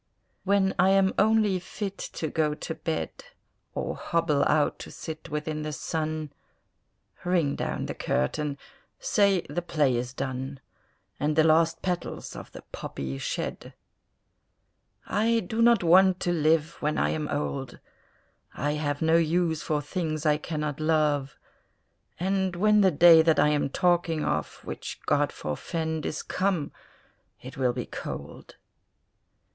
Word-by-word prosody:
When 195 Hz, -1 st, +3 dB
I 185 Hz, +2 st, +5 dB
am 195 Hz, 0 st, +4 dB
only 215 Hz, -2 st, +3 dB
fit 195 Hz, +2 st, -5 dB, 0.2 s
to 160 Hz, -, -3 dB
go 150 Hz, -1 st, 0 dB
to 160 Hz, -, -5 dB
bed, 160 Hz, -1 st, -3 dB, 0.6 s
Or -, -, -2 dB
hobble 165 Hz, -4 st, +1 dB
out 150 Hz, -1 st, +2 dB
to -, -, -8 dB
sit 160 Hz, 0 st, -8 dB
within 150 Hz, 0 st, -3 dB
the 155 Hz, 0 st, -3 dB
sun, 155 Hz, -1 st, -3 dB, 0.9 s
Ring 175 Hz, -6 st, +1 dB
down -, -, -3 dB
the -, -, -4 dB
curtain, 140 Hz, -, -1 dB, 0.4 s
say 200 Hz, -, +2 dB
the 175 Hz, -, -4 dB
play 150 Hz, -7 st, +1 dB
is 120 Hz, +1 st, -2 dB
done, 130 Hz, +1 st, -4 dB, 0.6 s
And 150 Hz, +1 st, 0 dB
the 160 Hz, -, +5 dB
last 165 Hz, +1 st, +3 dB
petals 180 Hz, -2 st, -3 dB
of -, -, -9 dB
the -, -, -11 dB
poppy 70 Hz, 0 st, -5 dB
shed! -, -, -4 dB, 1.3 s
I 230 Hz, +2 st, +2 dB
do 220 Hz, +3 st, -2 dB
not 235 Hz, -4 st, +5 dB
want 185 Hz, +2 st, +5 dB
to 175 Hz, -, +1 dB
live 160 Hz, 0 st, +2 dB
when 150 Hz, +1 st, 0 dB
I -, -, +2 dB
am 155 Hz, -1 st, -2 dB
old, 140 Hz, -3 st, -3 dB, 0.8 s
I 145 Hz, -, -1 dB
have 145 Hz, 0 st, -2 dB
no 160 Hz, +1 st, +4 dB
use 165 Hz, -1 st, +1 dB
for 150 Hz, -1 st, -1 dB
things 155 Hz, -1 st, -3 dB
I 150 Hz, -1 st, +4 dB
cannot 150 Hz, -2 st, -4 dB
love; 150 Hz, -3 st, +1 dB, 0.8 s
And 190 Hz, 0 st, 0 dB
when 210 Hz, +3 st, +4 dB
the 190 Hz, -, +6 dB
day 165 Hz, 0 st, +7 dB
that 160 Hz, -1 st, +3 dB
I 150 Hz, -, +5 dB
am 145 Hz, -2 st, +1 dB
talking 170 Hz, 0 st, +1 dB
of 75 Hz, -, -2 dB
(Which -, -, -6 dB
God -, -, +2 dB
forfend!) 160 Hz, -, -3 dB
is 155 Hz, -, -4 dB
come, 185 Hz, -6 st, -1 dB, 0.7 s
it 130 Hz, -, -10 dB
will 130 Hz, -2 st, +1 dB
be -, -, -4 dB
cold. -, -, -8 dB
160 Hz, 145 wpm, -27 LUFS, 150-180 Hz, 1.3 s, day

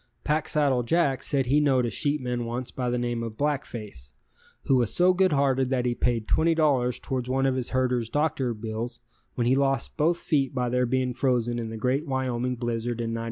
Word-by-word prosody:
Packsaddle 150 Hz, -3 st, +1 dB
Jack 140 Hz, 0 st, +1 dB
said 135 Hz, -2 st, 0 dB
he 140 Hz, +4 st, +3 dB
knowed 135 Hz, -4 st, +3 dB
a 115 Hz, -, -2 dB
sheepman 125 Hz, -5 st, -1 dB
once 120 Hz, +2 st, -4 dB
by 125 Hz, -1 st, -2 dB
the 125 Hz, -, 0 dB
name 120 Hz, -1 st, -2 dB
of 115 Hz, -2 st, -6 dB
Black 145 Hz, -1 st, 0 dB
Face, 70 Hz, -, -9 dB, 0.5 s
who 135 Hz, -, +2 dB
was 120 Hz, -4 st, +1 dB
so 180 Hz, +1 st, +4 dB
good 185 Hz, 0 st, +3 dB
hearted 135 Hz, -2 st, +2 dB
that 130 Hz, -2 st, 0 dB
he 120 Hz, -, +1 dB
paid 120 Hz, -2 st, -1 dB
$20 155 Hz, -7 st, +2 dB
towards 125 Hz, -2 st, -3 dB
one 135 Hz, +1 st, +1 dB
of 135 Hz, -, +2 dB
his 130 Hz, -2 st, -2 dB
herder's 125 Hz, -3 st, 0 dB
doctor 140 Hz, -5 st, 0 dB
bill 110 Hz, +2 st, -4 dB, 0.5 s
when 120 Hz, -, 0 dB
he 125 Hz, -, +3 dB
lost 135 Hz, -2 st, 0 dB
both 165 Hz, +3 st, +2 dB
feet 135 Hz, -6 st, 0 dB
by 125 Hz, -1 st, 0 dB
their 125 Hz, 0 st, +1 dB
being 130 Hz, 0 st, 0 dB
frozen 120 Hz, -2 st, 0 dB
in 115 Hz, -1 st, -4 dB
the 110 Hz, -, -6 dB
great 130 Hz, +7 st, 0 dB
Wyoming 125 Hz, -2 st, -1 dB
blizzard 120 Hz, 0 st, -3 dB
in 115 Hz, -1 st, -2 dB
'94. 115 Hz, -, -3 dB
125 Hz, 205 wpm, -26 LUFS, 120-140 Hz, 0.5 s, so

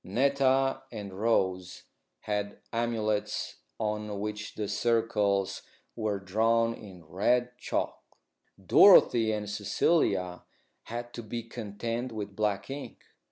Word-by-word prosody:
Netta 135 Hz, +4 st, +2 dB
and 105 Hz, -4 st, -7 dB
Rose 95 Hz, -3 st, 0 dB, 0.4 s
had 105 Hz, -1 st, -3 dB, 0.2 s
amulets 115 Hz, -3 st, -1 dB, 0.2 s
on 105 Hz, -1 st, -2 dB
which 105 Hz, 0 st, -5 dB
the 105 Hz, -, -3 dB
circles 105 Hz, -4 st, +1 dB, 0.3 s
were 105 Hz, -3 st, -1 dB
drawn 115 Hz, +4 st, +2 dB
in 95 Hz, -7 st, -12 dB
red 120 Hz, +9 st, +1 dB
chalk. -, -, -2 dB, 0.6 s
Dorothy 115 Hz, -2 st, +7 dB
and 105 Hz, -1 st, -3 dB
Cecilia 100 Hz, -, +1 dB, 0.4 s
had 120 Hz, +1 st, -6 dB
to 120 Hz, -, -6 dB
be 115 Hz, +1 st, -5 dB
content 115 Hz, +2 st, -4 dB
with 105 Hz, -3 st, -6 dB
black 105 Hz, -2 st, -1 dB
ink. 140 Hz, +1 st, -8 dB
105 Hz, 110 wpm, -29 LUFS, 100-115 Hz, 0.6 s, Dorothy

